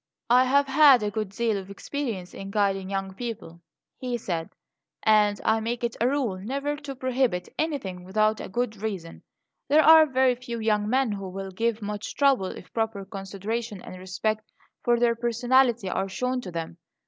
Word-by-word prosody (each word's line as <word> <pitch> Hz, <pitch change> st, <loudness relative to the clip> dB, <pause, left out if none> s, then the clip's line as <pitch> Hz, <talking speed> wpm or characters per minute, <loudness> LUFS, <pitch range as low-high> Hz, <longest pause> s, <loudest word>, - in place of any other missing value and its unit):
"I 250 Hz, +1 st, +6 dB
have 280 Hz, +2 st, +3 dB
had 275 Hz, -3 st, +6 dB
a 205 Hz, -, -1 dB
good 215 Hz, -1 st, -3 dB
deal 220 Hz, 0 st, 0 dB
of 190 Hz, 0 st, -10 dB
experience 200 Hz, -3 st, -5 dB
in 195 Hz, -, -7 dB
guiding 195 Hz, -2 st, 0 dB
young 195 Hz, -1 st, -3 dB
people," 195 Hz, -7 st, -7 dB, 0.4 s
he 250 Hz, -2 st, -2 dB
said; 170 Hz, -7 st, -3 dB, 0.5 s
"and 210 Hz, -2 st, +4 dB
I 220 Hz, 0 st, +3 dB
make 235 Hz, +2 st, -3 dB
it 235 Hz, -1 st, -1 dB
a 235 Hz, -, +4 dB
rule 255 Hz, -9 st, -1 dB
never 275 Hz, +8 st, -2 dB
to 285 Hz, -2 st, -7 dB
prohibit 255 Hz, -8 st, 0 dB
anything 250 Hz, -, -2 dB
without 215 Hz, +3 st, +1 dB
a -, -, -7 dB
good 230 Hz, +1 st, -2 dB
reason. 195 Hz, -6 st, -5 dB, 0.5 s
There 305 Hz, +2 st, +5 dB
are 320 Hz, 0 st, +8 dB
very 260 Hz, -2 st, +3 dB
few 240 Hz, -1 st, -6 dB
young 210 Hz, -1 st, +1 dB
men 260 Hz, -1 st, +2 dB
who 195 Hz, -2 st, -5 dB
will 195 Hz, +1 st, -6 dB
give 225 Hz, +2 st, -1 dB
much 210 Hz, 0 st, -5 dB
trouble 275 Hz, -9 st, +3 dB
if 185 Hz, -, -10 dB
proper 220 Hz, -3 st, -2 dB
consideration 200 Hz, +3 st, -5 dB
and 185 Hz, -, -9 dB
respect 215 Hz, +4 st, -3 dB, 0.3 s
for 240 Hz, -1 st, +3 dB
their 235 Hz, -1 st, +3 dB
personality 240 Hz, -1 st, +2 dB
are 190 Hz, +1 st, -1 dB
shown 250 Hz, +5 st, -2 dB
to 185 Hz, -, -8 dB
them. 165 Hz, 0 st, -5 dB
220 Hz, 180 wpm, -26 LUFS, 195-250 Hz, 0.5 s, are